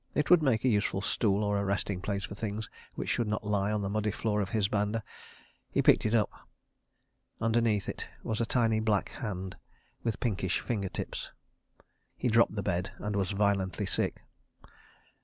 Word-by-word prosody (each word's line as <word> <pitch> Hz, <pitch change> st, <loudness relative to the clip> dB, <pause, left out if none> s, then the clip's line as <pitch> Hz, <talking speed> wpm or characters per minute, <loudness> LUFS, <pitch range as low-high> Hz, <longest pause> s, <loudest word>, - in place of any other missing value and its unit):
It 150 Hz, -, +1 dB
would 175 Hz, -2 st, +8 dB
make 130 Hz, -6 st, +2 dB
a -, -, +5 dB
useful 105 Hz, -4 st, +1 dB
stool 105 Hz, -1 st, +2 dB
or 100 Hz, -1 st, +1 dB
a -, -, 0 dB
resting 100 Hz, -1 st, -1 dB
place 100 Hz, 0 st, -2 dB
for -, -, -5 dB
things 105 Hz, +1 st, -3 dB, 0.3 s
which -, -, -4 dB
should 120 Hz, -, +1 dB
not 105 Hz, 0 st, -1 dB
lie 105 Hz, -1 st, +1 dB
on 105 Hz, -1 st, 0 dB
the -, -, -1 dB
muddy 110 Hz, 0 st, +1 dB
floor 105 Hz, 0 st, 0 dB
of 95 Hz, -, -2 dB
his 105 Hz, -1 st, +2 dB
banda. 105 Hz, +2 st, 0 dB, 0.7 s
He -, -, +1 dB
picked -, -, +5 dB
it 110 Hz, -, +2 dB
up. 105 Hz, -3 st, +3 dB, 1.1 s
Underneath 115 Hz, -3 st, +2 dB
it -, -, -4 dB, 0.2 s
was 110 Hz, +1 st, -1 dB
a -, -, +2 dB
tiny 115 Hz, -3 st, +2 dB
black 110 Hz, -2 st, +1 dB
hand 95 Hz, -6 st, -5 dB, 0.4 s
with 115 Hz, -2 st, -2 dB
pinkish 95 Hz, -6 st, 0 dB
finger 100 Hz, -6 st, -2 dB
tips. -, -, -4 dB, 0.9 s
He 125 Hz, -, 0 dB
dropped 115 Hz, -1 st, +4 dB
the 100 Hz, -, -2 dB
bed 90 Hz, 0 st, -1 dB
and 105 Hz, 0 st, -3 dB
was 95 Hz, -2 st, +1 dB
violently 100 Hz, -3 st, +1 dB
sick. -, -, -1 dB
105 Hz, 180 wpm, -30 LUFS, 100-110 Hz, 1.1 s, would